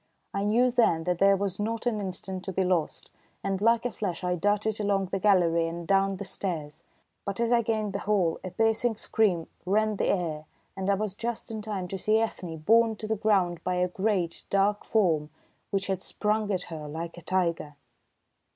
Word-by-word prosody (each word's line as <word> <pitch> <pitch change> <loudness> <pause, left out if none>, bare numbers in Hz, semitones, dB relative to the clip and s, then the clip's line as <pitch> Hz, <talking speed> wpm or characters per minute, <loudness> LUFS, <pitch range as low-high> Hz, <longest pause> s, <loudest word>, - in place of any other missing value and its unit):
I 200 0 -1
knew 240 +4 +3
then 225 -10 +3
that 180 0 -1
there 195 0 +5
was 195 -1 -2
not 225 +3 -2
an 220 -4 0
instant 190 -1 -4
to 190 - -3
be 190 +1 0
lost, 180 -4 -1 0.3
and 195 0 -1
like 230 +2 +3
a 245 - 0
flash 185 -5 -4
I 180 0 +1
darted 205 +4 0
along 200 -2 +1
the 195 - 0
gallery 175 -4 +3
and 170 0 -6
down 195 0 +3
the 200 - -5
stairs. 170 -6 -4 0.4
But 200 +1 -4
ere 235 0 +2
I 235 - +5
gained 215 -3 -1
the 200 - -2
hall 195 -6 +1
a 185 - -4
piercing 225 +3 +1
scream 190 -8 +1 0.2
rent 215 +2 +1
the - - +1
air, 160 -5 -1 0.3
and 190 0 -2
I 200 - +4
was 210 -1 -2
just 230 +2 -4
in 220 -1 -4
time 205 -4 -4
to 195 - -4
see 215 +3 +3
Ethne 185 -7 -2
borne 225 +7 +4
to 215 - -7
the 220 +1 0
ground 195 -5 +1
by 180 - 0
a 180 0 +2
great, 185 -2 -1
dark 200 +1 +2
form, 165 -9 +2 0.4
which 195 -1 -1
had 190 -1 -2
sprung 210 +1 0
at 185 -2 -1
her 155 -2 -6
like 165 +3 -5
a 175 - -10
tiger. 170 -4 -1
195 Hz, 205 wpm, -28 LUFS, 180-215 Hz, 0.4 s, there